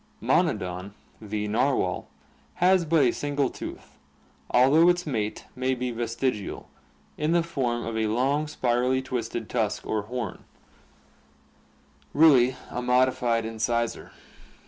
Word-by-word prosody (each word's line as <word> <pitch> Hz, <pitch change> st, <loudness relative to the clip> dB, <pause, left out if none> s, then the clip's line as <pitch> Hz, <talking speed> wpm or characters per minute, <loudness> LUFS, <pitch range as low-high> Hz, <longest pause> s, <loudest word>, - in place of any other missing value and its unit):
Monodon, 90 Hz, +2 st, 0 dB, 0.3 s
the 105 Hz, 0 st, -3 dB
narwhal, 105 Hz, -4 st, 0 dB, 0.5 s
has 180 Hz, 0 st, +3 dB
but 160 Hz, -2 st, +3 dB
a 120 Hz, -, +3 dB
single 145 Hz, -1 st, -1 dB
tooth, -, -, -9 dB, 0.5 s
although 145 Hz, +8 st, +5 dB
its 175 Hz, 0 st, +1 dB
mate 110 Hz, -8 st, -3 dB
may 130 Hz, +1 st, 0 dB
be 125 Hz, 0 st, -3 dB
vestigial, 115 Hz, -2 st, -3 dB, 0.5 s
in 155 Hz, +2 st, +1 dB
the 170 Hz, -1 st, +3 dB
form 125 Hz, -8 st, -2 dB
of 115 Hz, -, -4 dB
a 110 Hz, -1 st, 0 dB
long, 135 Hz, +7 st, +1 dB
spirally 125 Hz, -1 st, 0 dB
twisted 115 Hz, -3 st, -4 dB
tusk 110 Hz, -4 st, -1 dB
or 110 Hz, -, -1 dB
"horn," 115 Hz, -1 st, -5 dB, 1.7 s
really 135 Hz, -5 st, +6 dB, 0.2 s
a 125 Hz, -, -3 dB
modified 125 Hz, -2 st, +2 dB
incisor. 115 Hz, +1 st, -2 dB
125 Hz, 120 wpm, -26 LUFS, 115-140 Hz, 1.7 s, really